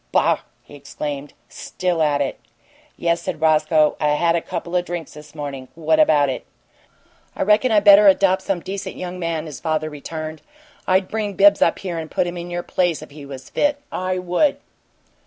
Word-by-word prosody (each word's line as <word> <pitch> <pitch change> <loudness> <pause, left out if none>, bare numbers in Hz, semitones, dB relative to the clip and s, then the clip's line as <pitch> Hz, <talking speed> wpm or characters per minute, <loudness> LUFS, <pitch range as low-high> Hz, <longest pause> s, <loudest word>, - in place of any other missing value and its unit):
"Boh!" - - +3 0.2
he - - -17
exclaimed. 145 0 -6
"Still 180 -3 -3
at 145 -2 +2
it!" 135 - -2 0.6
"Yes," 170 0 0
said 155 - -4
Roscoe. 155 -1 +3
"I've 150 -1 +2
had 170 +1 +2
a 170 - 0
couple 170 0 -5
of 180 - +2
drinks 175 -3 -6
this 150 0 -13
morning. 140 -3 -6
What 160 -1 +1
about 150 -8 +4
it?" 130 - -4 0.9
"I - - -1
reckon 215 +5 +3
I 210 -2 +4
better 205 0 +8
adopt 190 -1 +4
some 190 -2 -2
decent 195 +2 -6
young 180 0 -6
man," 165 -2 -2
his 150 -4 -8
father 155 -1 -2
returned. 155 +1 -7 0.5
"I'd 185 0 +2
bring 215 -2 -3
Bibbs 200 +2 +5
up - - +3
here 175 -4 -4
and 160 -1 -6
put - - 0
him 175 0 -4
in 175 0 -6
your 175 0 -3
place 175 -3 0
if - - -13
he 145 -1 -11
was 130 -1 -10
fit. 290 -1 +1
I 185 0 -2
would!" 180 - +1
170 Hz, 195 wpm, -21 LUFS, 150-185 Hz, 0.9 s, better